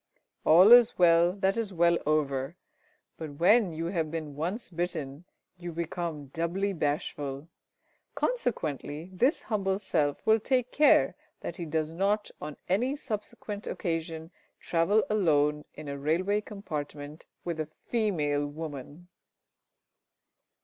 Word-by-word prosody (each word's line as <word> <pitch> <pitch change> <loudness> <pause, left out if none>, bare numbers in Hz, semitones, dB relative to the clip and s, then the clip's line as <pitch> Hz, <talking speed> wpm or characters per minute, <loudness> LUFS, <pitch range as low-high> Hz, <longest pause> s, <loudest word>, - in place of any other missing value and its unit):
All 180 +7 +8
is 240 -1 +8
well 170 0 +5
that 195 0 +1
is 225 -3 -2
well 170 -1 +3
over, 140 -1 0 0.6
but 155 -3 -6
when 190 +5 +4
you 165 +1 -4
have 160 -4 0
been 155 -3 -5
once 180 - -3
bitten, 165 -3 -4 0.3
you 175 -1 -6
become 165 -2 -4
doubly 185 +5 -1
bashful. 145 -2 -3 0.7
Consequently, 160 - -2
this 255 - +2
humble 195 -4 0
self 145 -8 -1
will 220 +1 +5
take 250 +2 0
care 300 0 +5 0.3
that - - -6
he 175 - -4
does 155 0 -1
not 200 +5 0
on 150 -1 -6
any 240 +10 +1
subsequent 210 -5 -6
occasion 165 -1 -3 0.3
travel 180 +6 +2
alone 150 -7 +2
in 155 -1 -9
a 140 0 -5
railway 185 +8 +1
compartment 150 -7 -7 0.2
with 170 -2 -4
a 155 -1 -3 0.2
female 150 -11 0
woman. 150 +2 -8
170 Hz, 125 wpm, -29 LUFS, 150-200 Hz, 0.7 s, All